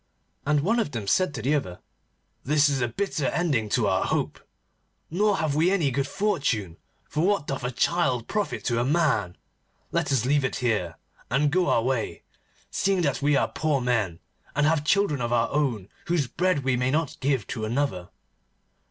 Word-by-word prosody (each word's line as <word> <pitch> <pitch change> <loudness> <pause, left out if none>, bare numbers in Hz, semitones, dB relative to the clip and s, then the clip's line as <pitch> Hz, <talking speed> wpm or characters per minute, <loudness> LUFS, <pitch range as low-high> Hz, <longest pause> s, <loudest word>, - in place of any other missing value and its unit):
And 150 -1 +3
one 225 +10 +1
of 145 -11 -2
them 110 -4 -3
said 185 - +2
to - - -5
the 140 +4 +2
other: 95 -12 -2 0.6
'This 145 +1 +3
is 135 -2 0
a 120 - +2
bitter 150 - -2
ending 145 -11 0
to - - +1
our - - +1
hope, - - -1 0.7
nor 205 +3 +2
have 155 -3 0
we 160 +5 +3
any 170 -8 +2
good 140 +1 -1
fortune, 140 - -1 0.3
for 155 - -1
what 200 -5 +2
doth 135 -3 -4
a 125 - 0
child 130 -2 0
profit 210 -1 -2
to 120 -2 +1
a - - +2
man? 135 - +1 0.5
Let - - 0
us 125 -4 +2
leave 145 +1 +2
it 130 - -1
here, 105 -10 -1 0.3
and 140 +5 +2
go 180 +2 +2
our 115 - +3
way, 130 -2 -2 0.5
seeing 195 -1 +1
that 140 -3 0
we 145 +1 +3
are 135 - +2
poor 155 -3 0
men, 115 -9 0 0.4
and 150 0 +3
have 155 -1 +2
children 155 -5 +2
of 120 0 -2
our 120 -1 +2
own 125 -10 0 0.2
whose 170 -5 +1
bread 180 +2 0
we 130 -1 +2
may 125 +1 0
not 155 +1 -1
give 130 -6 0
to 110 - -5
another. 110 -6 -1
140 Hz, 190 wpm, -26 LUFS, 120-160 Hz, 0.7 s, And